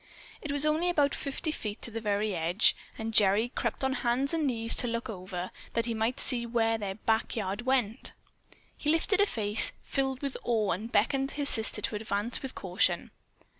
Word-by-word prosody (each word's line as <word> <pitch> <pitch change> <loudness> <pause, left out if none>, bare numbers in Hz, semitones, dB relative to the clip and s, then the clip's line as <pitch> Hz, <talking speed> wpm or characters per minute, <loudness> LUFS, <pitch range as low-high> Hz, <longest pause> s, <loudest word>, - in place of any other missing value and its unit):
It 305 - -4
was 285 +1 +1
only 315 +4 +1
about 290 -5 +2
fifty 285 +3 -3
feet 210 -8 -5
to 235 - +2
the 225 +1 -5
very 205 -1 -1
edge, 170 +6 +3 0.2
and 225 0 -4
Gerry 210 +3 +4
crept 265 - -2
on 265 0 +1
hands 255 +3 0
and 320 -3 0
knees 230 -3 +2
to 245 - +3
look 230 -1 -3
over, 185 -2 -6 0.2
that 230 0 0
he 235 - -2
might 225 +4 -1
see 245 -3 +2
where 225 -1 0
their 195 -2 -4
"back 220 +1 -1
yard 210 +3 -3
went." 245 -5 +1 0.6
He 295 - -3
lifted 330 +6 +2
a 405 - +4
face 210 - +3
filled 270 -1 -2
with 275 -1 -3
awe 220 -4 0
and 215 +7 -4
beckoned 270 +6 +1
his 285 0 -1
sister 220 -1 +4
to - - -1
advance 210 +2 -1
with 265 - -6
caution. 185 +1 0
230 Hz, 195 wpm, -29 LUFS, 210-270 Hz, 0.6 s, Gerry